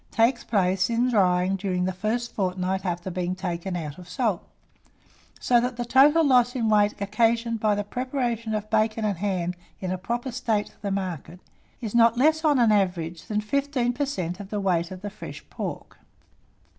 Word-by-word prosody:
takes 235 +2 +2
place 185 -2 +1
in 240 +2 +1
drying 185 -3 +3
during 185 -2 -1
the 185 - -1
first 225 +5 -2
fortnight 185 -1 -1
after 180 0 -3
being 180 0 -2
taken 180 0 -4
out 155 -2 -5
of 175 -1 -12
salt; 215 -4 -1 1.0
so 240 -1 +3
that 245 0 -2
the 240 - -2
total 290 +6 +5
loss 250 -2 +4
in 230 -3 0
weight 210 -1 +3
occasioned 230 +3 +1
by 210 -1 +2
the 205 - -1
preparation 240 -1 -2
of 210 0 -3
bacon 220 0 +1
and 200 -5 -1
hams 180 -3 -1 0.3
in 185 -1 -3
a 185 - -2
proper 240 +6 -3
state 225 -4 -1
for 200 - -2
market, 185 -3 -4 0.4
is 220 -4 -4
not 230 0 +5
less 315 +5 +3
on 300 -3 +4
an 235 -3 +4
average 180 -5 0
than 210 -1 -1
fifteen 260 +1 0
per 285 +3 -1
cent. 180 -7 -3
on 200 - -8
the 210 +1 -3
weight 175 -4 +1
of 185 -1 -9
the 205 - -3
fresh 215 - -10
pork. - - -6
210 Hz, 185 wpm, -25 LUFS, 185-240 Hz, 1.0 s, total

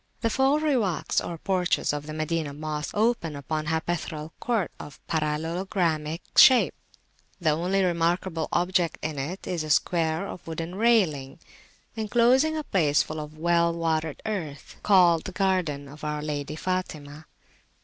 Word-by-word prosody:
The 230 - +1
four 270 +5 +3
Riwaks, 250 - +1
or 170 - -5
porches, 185 -3 0
of 145 0 -5
the 155 - -5
Madinah 155 -2 -2
Mosque 150 0 -4
open 215 -8 +1
upon 155 +2 -3
a - - -1
hypaethral 160 -1 -3
court 225 -8 -1
of 145 - -10
parallelogramic 160 +1 -1
shape. 255 -2 +7
[p.337] - - -35
The 165 - +2
only 180 +5 +1
remarkable 170 -1 0
object 175 -1 +1
in 155 -2 -3
it[FN#75] 155 +8 -5
is 170 -3 -2
a 155 - -6
square 160 +3 +1
of 175 - -9
wooden 165 +1 -5
railing 185 - +2 0.6
enclosing 245 +8 +3
a 310 - -2
place 155 - +2
full 155 0 -6
of 150 0 -8
well 170 +1 +2
watered 160 -2 -2
earth, 165 -10 -5
called 175 -5 +4
the - - -5
Garden 180 -8 0
of 145 +2 -13
our 150 0 -3
Lady 150 0 -3
Fatimah. 155 -4 -4
165 Hz, 150 wpm, -26 LUFS, 155-190 Hz, 0.6 s, shape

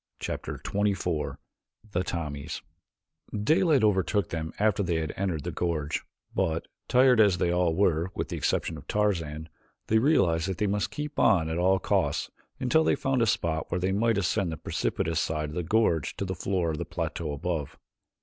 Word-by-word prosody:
Chapter - - -4
XXIV 95 -7 -1 0.5
The 90 -1 0
Tommies 75 -4 -4 0.8
Daylight 155 - +3
overtook 100 0 +2
them 80 -1 -3
after 105 -1 +2
they 85 -3 0
had 80 -1 -2
entered 90 -6 -2
the - - -3
gorge, 80 -3 -1 0.3
but, 80 0 0 0.2
tired 125 -1 +5
as 100 -4 +5
they 85 0 +1
all 90 -2 +2
were 85 -3 +2
with - - -3
the - - -3
exception 80 - -1
of 70 - -16
Tarzan, 80 -7 -1 0.4
they 110 - +3
realized 95 - +3
that 95 -2 -2
they 105 - +1
must 100 0 0
keep 150 0 -5
on 80 -6 +4
at 80 +1 -1
all 95 +2 +4
costs - - 0 0.3
until 130 +5 +3
they - - +3
found 135 -2 0
a 115 - +3
spot 80 -5 0
where 90 - -1
they 95 +2 0
might 110 +3 +2
ascend 95 -1 0
the 80 - -4
precipitous 80 +3 -1
side 75 -2 -1
of 75 - -8
the 90 - 0
gorge 85 - +1
to 100 - -2
the 95 - -2
floor 90 -2 -1
of 75 - -4
the - - -1
plateau 80 -3 -3
above. 75 0 -3
90 Hz, 185 wpm, -28 LUFS, 80-105 Hz, 0.8 s, tired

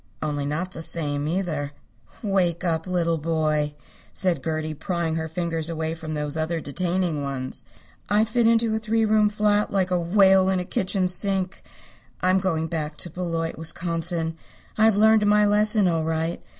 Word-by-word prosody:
Only 145 -2 -2
not 170 +6 -3
the 165 - -7
same, 150 -3 -1
either." 155 -5 -2 0.5
"Wake 185 -4 +1
up, 165 -1 -1
little 170 -3 0
boy," 155 -2 0 0.4
said 180 -3 +1
Gertie, 155 -1 -2
prying 170 +1 -2
her 160 0 -2
fingers 165 -1 -2
away 160 -1 -2
from 160 -1 -6
those 150 0 -2
other 160 +1 -1
detaining 170 +1 -1
ones. 135 -2 -4 0.4
"I'd 210 +2 +3
fit 230 +1 +2
into 230 -1 +3
a 220 - 0
three 225 +1 +1
room 215 -1 +3
flat 210 0 +1
like 190 -2 0
a 180 - +2
whale 190 +2 +4
in 190 -1 +1
a 180 - -3
kitchen 185 0 0
sink. 190 0 0 0.6
I'm 185 +1 +3
going 165 -4 -1
back 155 -2 -4
to 175 - -6
Beloit, 165 -2 -3
Wisconsin. 165 0 -2 0.4
I've 220 -1 +4
learned 215 0 +5
my 210 0 +5
lesson 210 0 +3
all 165 -2 +1
right. 160 +1 -2
170 Hz, 165 wpm, -24 LUFS, 160-195 Hz, 0.6 s, learned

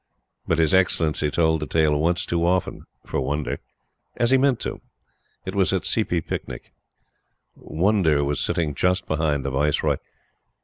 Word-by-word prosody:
But 80 - +1
His 80 +2 +2
Excellency 80 -5 +2
told 80 +1 +2
the 75 - -4
tale 80 -2 +2
once 85 +4 +1
too 85 -1 -1
often 90 +1 0 0.2
for - - -2
Wonder. 75 +3 -2 0.6
As 120 +1 +2
he 135 - +6
meant 135 -3 +2
to - - -1
do. - - -9 0.6
It 95 - -4
was 100 -2 +2
at 95 - 0
a - - -10
Seepee 90 -7 0
Picnic. - - -6 0.8
Wonder 85 -4 +1
was 70 0 -1
sitting 80 -4 -1
just 90 +6 0
behind 75 -3 -1
the 70 - -1
Viceroy. 75 +2 +1
80 Hz, 165 wpm, -23 LUFS, 75-95 Hz, 0.8 s, he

